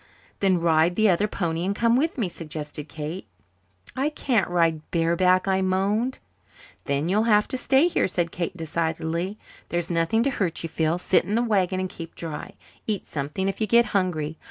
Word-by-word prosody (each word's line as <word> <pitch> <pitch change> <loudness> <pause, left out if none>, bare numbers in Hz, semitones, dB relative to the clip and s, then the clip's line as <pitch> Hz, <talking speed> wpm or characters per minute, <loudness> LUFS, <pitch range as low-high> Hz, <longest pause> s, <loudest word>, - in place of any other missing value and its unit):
"Then 190 -3 +3
ride 165 +1 +3
the 215 +1 +4
other 195 +3 +2
pony 170 -4 -2
and 195 +2 -1
come 230 +2 +3
with 310 +5 +1
me," 225 -7 0
suggested 155 -3 -7
Kate. 155 +2 -6 0.7
"I 275 +3 +1
can't 245 -10 0
ride 165 -3 +2
bareback," 180 +3 +2
I 190 0 +2
moaned. 200 +7 0 0.7
"Then 140 +2 0
you'll 210 +5 +2
have 210 -1 +4
to - - -2
stay 270 +5 +3
here," 355 - +1
said 175 -2 -1
Kate 175 +1 -4
decidedly. 165 +3 -2 0.3
"There's 175 0 -1
nothing 170 +7 +2
to 275 - +1
hurt 180 -10 -2
you, 165 - -3
Phil. 160 +1 0
Sit 180 +1 +2
in 205 - -2
the 235 - +2
wagon 190 -5 +1
and 185 - -1
keep 165 -2 -9
dry. 160 -3 -6 0.3
Eat 210 -3 -2
something 150 +6 -3
if 195 - -3
you 215 - +2
get 235 +3 +5
hungry. 160 -5 -1
180 Hz, 185 wpm, -25 LUFS, 165-210 Hz, 0.7 s, get